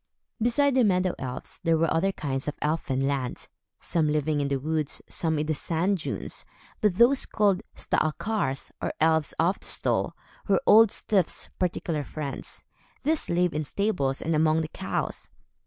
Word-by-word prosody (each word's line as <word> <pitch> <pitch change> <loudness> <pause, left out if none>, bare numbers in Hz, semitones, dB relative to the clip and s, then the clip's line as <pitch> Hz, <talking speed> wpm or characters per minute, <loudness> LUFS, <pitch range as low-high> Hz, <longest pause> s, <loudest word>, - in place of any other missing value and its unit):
Beside 270 +5 +3
the 255 -1 +4
meadow 185 -3 +2
elves, 125 -1 -5
there 165 -1 +3
were 165 0 +2
other 195 +4 +2
kinds 135 -6 -3
in 150 - -2
Elfin 140 -3 0
Land; 135 -3 -2 0.3
some 160 -3 0
living 150 0 +1
in 140 - 0
the 140 -1 0
woods, 155 +1 -1
some 160 -2 -1
in 150 - 0
the 155 - 0
sand 175 +6 0
dunes, - - -4 0.4
but 210 -5 +3
those 250 +6 +4
called 200 -3 +2
Staalkaars, 155 -3 -1
or - - -1
elves 160 -1 +2
of 175 +4 +2
the - - -11
stall, - - 0 0.3
were - - +4
Old 225 0 +7
Styf's 195 -4 0
particular 170 -4 -1
friends. 140 0 -5 0.4
These 310 +2 0
lived 175 0 +2
in 155 +1 -1
stables 145 -6 -1
and 165 - 0
among 155 +1 +3
the 155 - -4
cows. - - -4
160 Hz, 165 wpm, -27 LUFS, 150-195 Hz, 0.4 s, Old